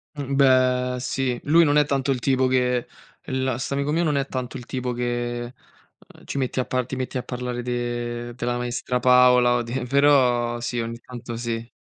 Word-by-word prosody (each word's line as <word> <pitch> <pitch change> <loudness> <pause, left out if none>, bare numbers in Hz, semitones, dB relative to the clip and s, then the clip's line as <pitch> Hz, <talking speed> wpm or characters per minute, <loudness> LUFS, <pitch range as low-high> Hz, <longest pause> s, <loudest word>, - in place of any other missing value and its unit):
Mh, 140 -2 -4
beh, 130 -2 +3
sì, 130 -1 -2
lui 165 +3 +5
non 145 -1 +3
è 150 - +5
tanto 140 -1 -1
il 130 - 0
tipo 130 0 +2
che 125 -1 +1 0.4
l 130 -1 -1
st'amico 140 +2 -2
mio 165 +2 +1
non 150 -4 +1
è 135 - 0
tanto 130 -1 -5
il 125 - -10
tipo 125 0 -3
che, 120 0 -3 0.6
uhm, - - -18
ci - - -5
metti 130 0 -1
a 125 - 0
parlare 125 -1 -1
ti 130 - -5
metti 130 +1 -3
a 125 - -3
parlare 125 -1 -4
de 120 -1 -3
della 120 0 -2
maestra 125 +1 -2
Paola 125 0 +5
o 120 - +1
di 115 - -7
però 125 -4 +3
sì, 120 +1 -3
ogni 115 0 -4
tanto 120 -1 -8
sì. 115 0 -4
125 Hz, 200 wpm, -23 LUFS, 120-130 Hz, 0.6 s, lui